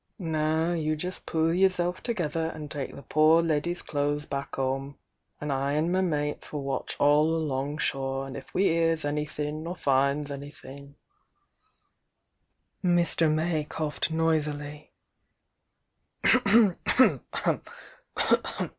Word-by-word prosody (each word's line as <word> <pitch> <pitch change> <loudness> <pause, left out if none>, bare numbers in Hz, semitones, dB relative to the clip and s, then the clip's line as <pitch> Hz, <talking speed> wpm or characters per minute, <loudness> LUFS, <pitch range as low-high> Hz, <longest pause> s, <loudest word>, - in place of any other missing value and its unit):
Now 160 -1 0
you 155 -2 0
just 180 +4 -6
pull 160 0 +1
yerself 180 -1 +1
together 165 -8 -2
an' 150 -2 -7
take 145 -2 -4
the 140 - -10
poor 155 +2 +4
leddy's 165 +2 -1
clothes 145 0 -1
back 140 -1 -5
'ome— 135 +1 -2 0.4
an' 150 -1 -3
I 135 +1 0
an' 155 +3 +1
my 185 +1 +2
mates 150 -5 -1
will 145 -2 -4
watch 135 -1 -3
all 145 +1 +4
along 145 -2 -2
shore, 135 -2 -1
an' 135 - -8
if 135 - -9
we 190 - +1
hears 165 -3 +2
anythin' 150 +1 -3
or 175 - -4
finds 140 -1 +1
anythin' 140 0 -10 0.9
" 85 +4 -50
Mr. 175 -3 +3
May 155 0 0
coughed 155 0 -3
noisily. 150 -2 -1
150 Hz, 120 wpm, -27 LUFS, 140-165 Hz, 0.9 s, poor